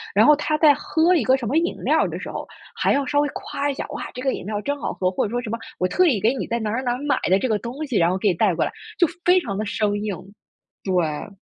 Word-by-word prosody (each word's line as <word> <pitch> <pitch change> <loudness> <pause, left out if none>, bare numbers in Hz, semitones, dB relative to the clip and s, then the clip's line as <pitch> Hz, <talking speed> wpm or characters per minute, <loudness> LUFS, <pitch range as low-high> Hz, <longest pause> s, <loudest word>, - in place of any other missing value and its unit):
然 215 +2 +6
后 300 - +8
他 305 +1 -1
在 300 -2 +6
喝 330 +5 +2
一 300 - +2
个 260 - +5
什 255 -3 -4
么 280 +8 +1
饮 340 +2 +1
料 - - +3
儿 - - -1
的 - - -5
时 - - -6
候， - - -6 0.3
还 - - +1
要 280 -1 +1
稍 290 0 +1
微 290 - +2
夸 285 +1 -3
一 - - -1
下： - - -5
“哇， 290 - -5
这 250 - -6
个 265 -1 0
饮 - - -6
料 210 0 -3
儿 - - -3
真 285 +5 -3
好 - - -3
喝， 185 -1 0
“或 185 - 0
者 - - -3
说 245 +2 -2
什 225 - -6
么 230 +1 -3 0.2
我 185 - 0
特 365 - +3
意 225 - +2
给 225 +4 +3
你 270 - -4
在 235 - -1
哪 215 -1 -2
儿 250 +3 -1
哪 245 - 0
儿 - - -3
哪 280 - -8
儿 - - -4
买 285 - +1
的 190 - +5
这 250 +5 -1
个 210 -2 +1
东 260 +6 -5
西， 255 -7 -1
然 170 0 +4
后 185 - 0
给 205 +1 +2
你 - - +2
带 180 0 +2
过 - - +1
来。 - - -2 0.3
就 350 - +5 0.2
非 360 +1 +6
常 200 -8 -4
地 215 - -2
生 205 0 -1
硬。 210 -2 -2 0.7
对。 180 +1 -1
235 Hz, 355 characters per minute, -22 LUFS, 205-290 Hz, 0.7 s, 后